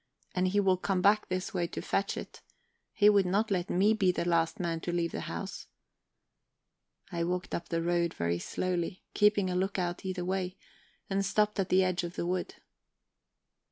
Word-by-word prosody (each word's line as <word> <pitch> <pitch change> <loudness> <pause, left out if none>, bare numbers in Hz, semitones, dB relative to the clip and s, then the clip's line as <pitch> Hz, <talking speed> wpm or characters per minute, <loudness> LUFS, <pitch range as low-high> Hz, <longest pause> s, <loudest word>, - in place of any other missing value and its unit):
"And 185 0 +1
he 200 +3 +2
will 190 -2 +3
come 185 0 -1
back 210 +1 +4
this 185 +4 -2
way 175 -2 0
to - - -6
fetch 195 - -1
it. - - -8 0.5
He 205 - +4
would 200 -3 +5
not 205 +4 +1
let 180 -2 0
me 200 +4 +4
be 195 -4 +3
the 175 - -2
last 170 +4 +1
man 170 -2 -1
to 175 - -3
leave 170 -1 0
the - - -4
house..." - - -6 1.4
I 170 -1 -1
walked 180 +1 -2
up 170 - -3
the 165 -1 0
road 170 -1 +1
very 85 0 -1
slowly, 180 - -2
keeping 205 -2 +3
a - - -1
lookout 180 -2 -1
either 185 -2 -3
way, 185 0 -2 0.5
and 195 0 0
stopped 210 +1 +1
at 190 - 0
the 190 +1 +5
edge 185 -1 0
of 175 0 -5
the - - -2
wood. 180 +1 -2
185 Hz, 190 wpm, -30 LUFS, 175-195 Hz, 1.4 s, would